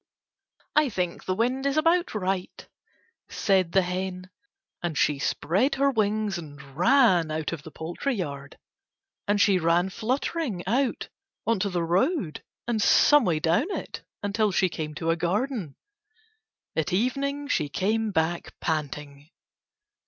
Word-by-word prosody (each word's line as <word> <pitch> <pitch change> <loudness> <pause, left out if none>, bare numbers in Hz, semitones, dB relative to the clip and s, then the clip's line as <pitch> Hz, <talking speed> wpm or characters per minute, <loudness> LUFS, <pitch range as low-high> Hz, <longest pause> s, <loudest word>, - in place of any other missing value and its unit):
"I 305 -2 +4
think 180 -5 -3
the 185 - 0
wind 255 +5 0
is 280 +2 0
about 335 -1 +2
right," 190 -2 -3 0.6
said 190 -4 +1
the 190 +1 +4
hen; 185 +1 -4 0.5
and 170 -4 -3
she 145 -2 +2
spread 190 - +1
her 275 +1 +3
wings 215 -4 0
and 145 -3 -10 0.2
ran 185 - +4
out 155 +1 -2
of 165 - -5
the 160 - -10
poultry 175 - -3
yard. 140 -7 -5 0.7
And 205 0 +2
she 200 -2 +4
ran 175 +3 +2
fluttering 245 - -2
out 250 +6 0 0.4
on 230 -2 +1
to 200 - 0
the 175 -2 -1
road 185 - 0 0.2
and 230 -3 0
some 295 +4 +5
way 165 -4 +1
down 170 - +1
it - - -5 0.2
until 205 +1 +1
she 185 0 +2
came 155 -2 -5
to 165 +2 0
a - - +2
garden. 195 - -2 1.0
At 160 -2 0
evening 280 +7 0
she 150 - 0
came 215 +8 0
back 170 -2 -2
panting. 150 -2 -4
190 Hz, 145 wpm, -26 LUFS, 165-240 Hz, 1.0 s, some